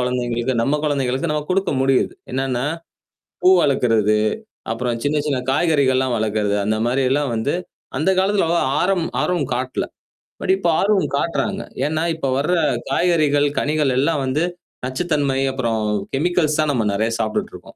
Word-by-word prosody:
குழந்தைகளுக்கு 125 Hz, 0 st, -1 dB
நம்ம 140 Hz, +5 st, +1 dB
குழந்தைகளுக்கு 135 Hz, +1 st, 0 dB
நம்ம 150 Hz, -1 st, -2 dB
குடுக்க 195 Hz, +1 st, +1 dB
முடியுது, 135 Hz, -1 st, +2 dB, 0.2 s
என்னன்னா, 130 Hz, -1 st, -1 dB, 0.8 s
பூ 180 Hz, -, +7 dB
வளர்க்கறது, 115 Hz, -7 st, +2 dB, 0.6 s
அப்புறம் 120 Hz, 0 st, -2 dB
சின்ன, 145 Hz, +1 st, +1 dB
சின்ன 140 Hz, -4 st, 0 dB
காய்கறிகள்லாம் 135 Hz, -5 st, +2 dB
வளர்க்கறது, 105 Hz, -2 st, 0 dB
அந்த 110 Hz, +1 st, 0 dB
மாரியெல்லாம் 135 Hz, +2 st, +1 dB
வந்து, 115 Hz, +5 st, -1 dB, 0.4 s
அந்த 155 Hz, +6 st, +2 dB
காலத்தில 195 Hz, -2 st, +1 dB
வக 170 Hz, -, +2 dB, 0.2 s
ஆரம், 180 Hz, -2 st, +1 dB, 0.2 s
ஆரம் 175 Hz, -5 st, 0 dB
காட்ல, 130 Hz, +1 st, -2 dB, 0.6 s
பட் 190 Hz, -, +2 dB
இப்ப 190 Hz, -, -1 dB
ஆர்வம் 200 Hz, -1 st, +1 dB
காட்டுறாங்க. 195 Hz, +6 st, -1 dB, 0.2 s
ஏன்னா 155 Hz, +1 st, -1 dB
இப்ப 140 Hz, -4 st, -2 dB
வர 145 Hz, -, -1 dB, 0.4 s
காய்கறிகள், 150 Hz, -5 st, +3 dB
கனிகள் 150 Hz, -2 st, +1 dB
எல்லாம் 145 Hz, +1 st, +1 dB
வந்து 135 Hz, +5 st, 0 dB, 0.4 s
நச்சுத்தன்மை, 140 Hz, 0 st, 0 dB
அப்புறம் 115 Hz, -4 st, -1 dB, 0.3 s
கெமிக்கல்ஸ் 155 Hz, +1 st, +1 dB
தான் 155 Hz, -, +2 dB
நம்ம 120 Hz, -5 st, 0 dB
நெறைய 110 Hz, +3 st, 0 dB
சாப்டுட்டுருக்கோம். 110 Hz, -1 st, -4 dB
135 Hz, 140 wpm, -20 LUFS, 125-155 Hz, 0.8 s, பூ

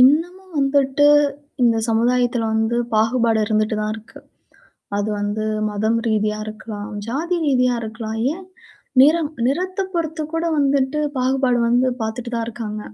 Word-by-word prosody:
இன்னமும் 345 Hz, +7 st, +3 dB
வந்துட்டு, 275 Hz, 0 st, +2 dB, 0.6 s
இந்த 235 Hz, -2 st, +4 dB
சமுதாயத்தில 240 Hz, +1 st, +1 dB
வந்து, 220 Hz, +1 st, +1 dB, 0.2 s
பாகுபாடு 230 Hz, +1 st, +2 dB
இருந்துட்டு 215 Hz, 0 st, +1 dB
தான் 215 Hz, 0 st, -1 dB
இருக்கு. 220 Hz, 0 st, -12 dB, 0.8 s
அது 205 Hz, +1 st, -1 dB
வந்து, 205 Hz, +1 st, -2 dB, 0.3 s
மதம் 215 Hz, +2 st, 0 dB
ரீதியா 215 Hz, -1 st, 0 dB
இருக்கலாம், 215 Hz, 0 st, -7 dB, 0.2 s
ஜாதி 320 Hz, +9 st, -1 dB
ரீதியா 250 Hz, -3 st, +3 dB
இருக்கலாம். 220 Hz, 0 st, -5 dB
ஏன்? 370 Hz, +3 st, -9 dB, 0.6 s
நிறம் 305 Hz, +2 st, +4 dB, 0.2 s
நிறத்தைப் 370 Hz, +7 st, -1 dB
பொறுத்து 320 Hz, -1 st, -2 dB
கூட 330 Hz, +1 st, -1 dB
வந்துட்டு 275 Hz, +1 st, +1 dB, 0.2 s
பாகுபாடு 255 Hz, -1 st, +1 dB
வந்து 245 Hz, +2 st, +3 dB
பாத்துட்டு 225 Hz, +2 st, -4 dB
தான் 230 Hz, -1 st, -1 dB
இருக்காங்க. 215 Hz, -2 st, -5 dB
245 Hz, 130 wpm, -21 LUFS, 220-280 Hz, 0.8 s, இந்த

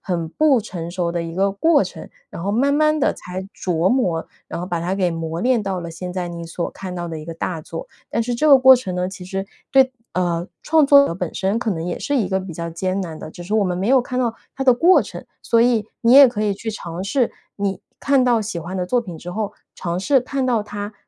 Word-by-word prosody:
很 170 Hz, -4 st, -3 dB
不 295 Hz, -, +3 dB
成 175 Hz, -6 st, -6 dB
熟 175 Hz, -1 st, -2 dB
的 170 Hz, -1 st, -1 dB
一 165 Hz, 0 st, -6 dB
个 195 Hz, +1 st, +1 dB
过 305 Hz, +8 st, +3 dB
程， -, -, -9 dB, 0.2 s
然 170 Hz, -, -7 dB
后 200 Hz, -, -1 dB
慢 270 Hz, +7 st, +2 dB
慢 305 Hz, +1 st, +3 dB
地 -, -, +2 dB
才 185 Hz, +1 st, -7 dB
琢 175 Hz, -1 st, -1 dB
磨， 180 Hz, -11 st, +1 dB, 0.2 s
然 -, -, -5 dB
后 180 Hz, -, -4 dB
把 175 Hz, -3 st, -2 dB
它 180 Hz, +3 st, -1 dB
给 185 Hz, -3 st, +1 dB
磨 165 Hz, +1 st, -4 dB
炼 245 Hz, -3 st, +2 dB
到 190 Hz, -2 st, -2 dB
了 170 Hz, -1 st, -6 dB
现 180 Hz, +2 st, -6 dB
在 180 Hz, -1 st, -3 dB
你 170 Hz, -1 st, -6 dB
所 170 Hz, +1 st, -4 dB
看 185 Hz, -2 st, -7 dB
到 175 Hz, -1 st, -4 dB
的 160 Hz, -2 st, -5 dB
一 155 Hz, -, -9 dB
个 165 Hz, -, -6 dB
大 165 Hz, 0 st, -3 dB
作。 -, -, -7 dB, 0.2 s
但 230 Hz, -, 0 dB
是 240 Hz, +1 st, -2 dB
这 305 Hz, +6 st, +2 dB
个 275 Hz, -2 st, +9 dB
过 260 Hz, 0 st, +9 dB
程 195 Hz, -8 st, -3 dB
呢， 180 Hz, 0 st, -1 dB
其 185 Hz, -2 st, -9 dB
实 195 Hz, +1 st, -4 dB, 0.2 s
对 265 Hz, -1 st, +5 dB, 0.2 s
呃， 175 Hz, 0 st, -1 dB
创 310 Hz, -2 st, +4 dB
作 280 Hz, 0 st, +7 dB
者 -, -, -3 dB
本 180 Hz, -1 st, -4 dB
身 195 Hz, +4 st, 0 dB
可 235 Hz, -2 st, -1 dB
能 165 Hz, -4 st, -3 dB
也 175 Hz, -, -3 dB
是 285 Hz, -1 st, -1 dB
一 220 Hz, -, +1 dB
个 190 Hz, -1 st, 0 dB
比 185 Hz, -4 st, -8 dB
较 170 Hz, 0 st, -4 dB
艰 185 Hz, +3 st, -2 dB
难 160 Hz, -3 st, -6 dB
的， 155 Hz, -, -8 dB
只 175 Hz, -, -10 dB
是 195 Hz, +5 st, -7 dB
我 215 Hz, -1 st, +3 dB
们 180 Hz, -2 st, -1 dB
没 190 Hz, +3 st, -2 dB
有 265 Hz, 0 st, +5 dB
看 250 Hz, +1 st, -4 dB
到 235 Hz, -3 st, 0 dB, 0.2 s
它 270 Hz, -, -2 dB
的 255 Hz, -, +7 dB
过 340 Hz, +9 st, +5 dB
程， -, -, -9 dB, 0.2 s
所 230 Hz, -1 st, +3 dB
以 230 Hz, -3 st, +3 dB
你 235 Hz, +1 st, +4 dB
也 275 Hz, +1 st, +10 dB
可 235 Hz, -4 st, -2 dB
以 205 Hz, -2 st, +1 dB
去 220 Hz, +3 st, -5 dB
尝 175 Hz, -3 st, -6 dB
试 245 Hz, +4 st, +1 dB, 0.3 s
你 200 Hz, -1 st, -2 dB, 0.2 s
看 275 Hz, -2 st, +3 dB
到 240 Hz, -3 st, +3 dB
喜 200 Hz, -5 st, -4 dB
欢 175 Hz, +3 st, -6 dB
的 180 Hz, -1 st, -2 dB
作 245 Hz, +4 st, +1 dB
品 175 Hz, -6 st, -8 dB
之 175 Hz, -, -7 dB
后， 210 Hz, +2 st, -3 dB, 0.2 s
尝 175 Hz, 0 st, -3 dB
试 270 Hz, +8 st, +3 dB
看 260 Hz, +1 st, -2 dB
到 235 Hz, -4 st, +1 dB
它 205 Hz, 0 st, -6 dB
195 Hz, 285 characters per minute, -21 LUFS, 175-245 Hz, 0.3 s, 也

